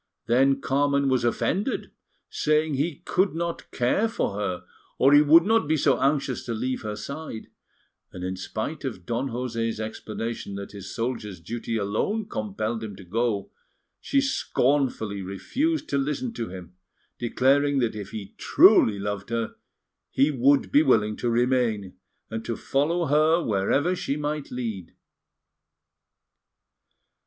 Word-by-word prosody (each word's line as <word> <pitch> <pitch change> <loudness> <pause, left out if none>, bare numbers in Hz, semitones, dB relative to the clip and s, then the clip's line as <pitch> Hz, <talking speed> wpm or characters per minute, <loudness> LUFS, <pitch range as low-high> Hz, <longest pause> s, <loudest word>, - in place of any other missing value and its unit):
Then 135 +3 +3
Carmen 140 0 +2
was 130 -2 +2
offended, 190 - -1 0.4
saying 155 0 +1
he 145 +2 -2
could 190 -2 +1
not 170 0 -4
care 125 - +1
for 225 - -2
her 100 -3 -3 0.3
or 135 +2 +5
he 145 - +8
would 160 +3 +7
not 225 -3 +2
be 155 +1 +2
so 140 -2 +2
anxious 135 -1 0
to 115 - -3
leave 130 +3 -2
her 105 -2 -4
side; 140 +2 -7 0.6
and 90 - -8
in 95 +1 -2
spite 110 +10 -5
of 110 -10 -5
Don 120 +6 -2
José's 115 -2 -2
explanation 110 -1 -5
that 100 0 -7
his 100 -2 -9
soldier's 115 -6 -4
duty 115 +6 -4
alone 110 - -1
compelled 110 - -3
him 105 -3 -6
to 95 - -12
go, 105 +2 -1 0.5
she 280 - +1
scornfully 135 - 0
refused 270 - -2
to 140 - +1
listen 150 - -2
to 115 - -4
him, 90 -2 -9 0.5
declaring 140 +4 +2
that 120 -4 0
if 100 -2 -6
he 105 -3 -8
truly 105 -2 +6
loved 100 0 -4
her 115 -1 -2 0.6
he 140 +3 +3
would 135 +1 +3
be 145 - +6
willing 110 -7 +3
to 120 - -1
remain, 120 -5 +1 0.4
and 110 0 -4
to 115 - -3
follow 165 +5 0
her 155 +3 +4
wherever 115 - +1
she 145 -5 -2
might 150 0 -3
lead. 110 -9 -5
125 Hz, 145 wpm, -25 LUFS, 110-145 Hz, 0.6 s, he